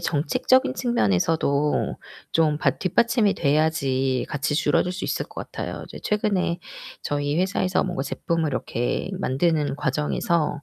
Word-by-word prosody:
정책적인 255 - +2
측면에서도 150 - +1 0.4
좀 155 -2 +3
받 - - +1
뒷받침이 225 +3 +2
돼야지 140 -4 +1
같이 145 +1 -1
줄어들 180 +3 +2
수 185 - -5
있을 - - -2
것 - - -8
같아요. - - -5
이제 - - -10
최근에 200 -5 0 0.4
저희 145 +1 -1
회사에서 185 0 +1
뭔가 180 -7 -2
제품을 165 +2 -1
이렇게 125 +4 -2
만드는 150 -2 +1
과정에서 150 +2 0
160 Hz, 315 characters per minute, -24 LUFS, 145-185 Hz, 0.4 s, 좀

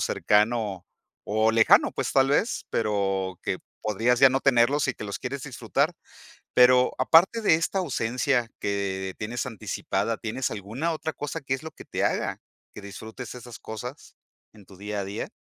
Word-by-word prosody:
cercano 105 -3 +1 0.4
o 110 +1 +2
lejano, 115 0 +5
pues - - -2
tal 135 0 +4
vez, 205 +11 +1
pero 95 -4 -1
que - - -2 0.2
podrías 115 +4 +1
ya 135 - +9
no 135 +1 +1
tenerlos 135 +3 +3
y 130 - 0
que - - -8
los 100 -1 -5
quieres 135 +1 -4
disfrutar. 135 +3 -1 0.6
Pero 125 0 +6
aparte 190 +8 +5
de 210 - +4
esta 170 +4 -1
ausencia 125 -5 0
que 95 -2 -2
tienes 115 +3 -3
anticipada, 110 -2 -2
¿tienes 115 +3 -3
alguna 110 - -3
otra 160 0 -4
cosa 145 +2 -5
que 135 -1 -2
es 135 - -3
lo 160 - -6
que - - -13
te - - -3
haga - - -1 0.3
que 105 - -9
disfrutes 110 +5 -8
esas 120 -1 -10
cosas 120 +5 -8 0.4
en 105 -2 -17
tu 95 - -15
día 105 +1 -4
a 95 - -5
día? 100 +2 -5
120 Hz, 170 wpm, -26 LUFS, 105-135 Hz, 0.6 s, ya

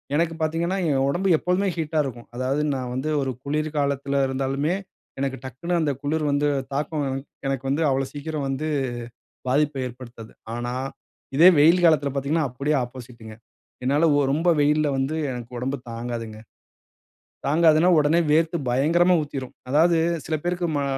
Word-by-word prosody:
எனக்கு 165 +1 +1
பார்த்தீங்கன்னா, 165 +4 0
என் 135 -1 +2
உடம்பு 185 +5 0
எப்பவுமே 185 +2 +1
ஹீட்டா 160 -1 -1
இருக்கும். 120 -3 -8
அதாவது 130 +3 0
நான் 125 -2 -4
வந்து 140 +4 -2
ஒரு 135 -1 -2
குளிர் 150 +2 -1
காலத்துல 140 0 0
இருந்தாலுமே, 135 +5 -1 0.4
எனக்கு 135 -1 -2
டக்குனு 130 +8 -4
அந்த 150 - +1
குளிர் 155 +2 0
வந்து 145 +1 +1 0.3
தாக்கம் 150 +1 -1 0.4
எனக்கு 135 -1 -2
வந்து, 145 +4 0
அவ்வளோ 135 0 +1
சீக்கிரம் 145 -1 -4
வந்து 135 +4 -2 0.8
பாதிப்ப 145 +1 +1
ஏற்படுத்தாது. 120 -2 -10 0.2
ஆனா, 120 +1 -3 0.6
இதே 170 +5 +9
வெயில் 170 +4 +5
காலத்தில 150 -4 +4
பார்த்தீங்கன்னா, 145 +3 0
அப்படியே 140 +4 0
ஆப்போசிட்டுங்க. 120 -3 -11 0.5
என்னால 145 +5 +2
ஒ - - +4
ரொம்ப 165 +4 +1
வெயில்ல 150 +1 +3
வந்து 135 +4 -1 0.2
எனக்கு 120 -2 -6
உடம்பு 135 +3 -2
தாங்காதுங்க. 115 -2 -5 1.1
தாங்காதுன்னா, 160 +3 +4
உடனே 150 +3 +3
வேர்த்து 165 +2 +2
பயங்கரமா 170 +8 +3
ஊத்திரும். 135 -4 -6 0.2
அதாவது 165 +4 +4 0.3
சில 160 - -1
பேருக்கு 175 0 0
மா 140 - 0
145 Hz, 145 wpm, -24 LUFS, 130-160 Hz, 1.1 s, இதே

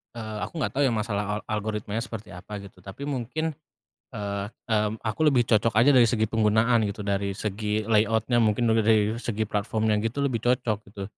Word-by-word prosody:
Eee, 110 -2 -6
aku 170 - -6
nggak 140 - -1
tahu 140 - 0
ya - - -1
masalah 105 -2 -1
al - - -4
algoritmanya 105 0 -3
seperti 115 -4 -7
apa 100 +4 -8
gitu. 100 -2 -12
Tapi 100 +9 -8
mungkin, 145 +4 -2 0.6
eee, 100 -2 -3 0.2
mmm, 105 0 0
aku 110 +6 -3
lebih 135 -5 +5
cocok 110 0 +3
aja 120 +6 +5
dari 125 -4 +6
segi 110 -2 +1
penggunaan 110 +1 +3
gitu, 100 +1 -4
dari 100 0 -1
segi 105 +1 -2
layout-nya 110 +2 +2
mungkin 115 +1 +2
juga 110 -1 +3
dari 110 0 +3
segi 110 -2 -2
platform-nya 110 +1 0
gitu, 125 +5 -2
lebih 130 -4 +1
cocok 120 -3 +1
gitu. 100 0 -8
110 Hz, 190 wpm, -26 LUFS, 105-115 Hz, 0.6 s, dari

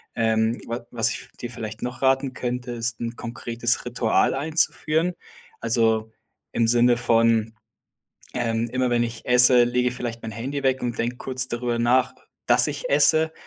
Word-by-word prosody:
Ähm, 110 +1 +1
wa 115 +1 -5
was 115 -1 +1
ich - - -7
dir 120 - -5
vielleicht 110 -2 -7
noch 125 +1 -5
raten 135 0 +1
könnte, 125 0 -4
ist 115 -1 -1
'n 115 0 -4
konkretes 120 +1 -1
Ritual 120 -2 +1
einzuführen. 160 +3 0 0.5
Also, 110 -1 +1 0.4
im 115 - +1
Sinne 120 +1 +4
von: 115 -2 +2 0.8
„Ähm, 115 -1 -1
immer 130 0 0
wenn 120 0 +2
ich 115 0 -7
esse, 125 0 +6
lege 125 +1 +1
ich - - -7
vielleicht 120 -2 -5
mein 110 - -6
Handy 135 +6 -4
weg 130 0 +1
und 120 -1 -3
denk 120 +1 -2
kurz 130 -1 -1
darüber 120 -1 -2
nach, 125 +2 +2 0.3
dass - - +5
ich - - -5
esse“ 160 - +4
120 Hz, 165 wpm, -23 LUFS, 115-125 Hz, 0.8 s, esse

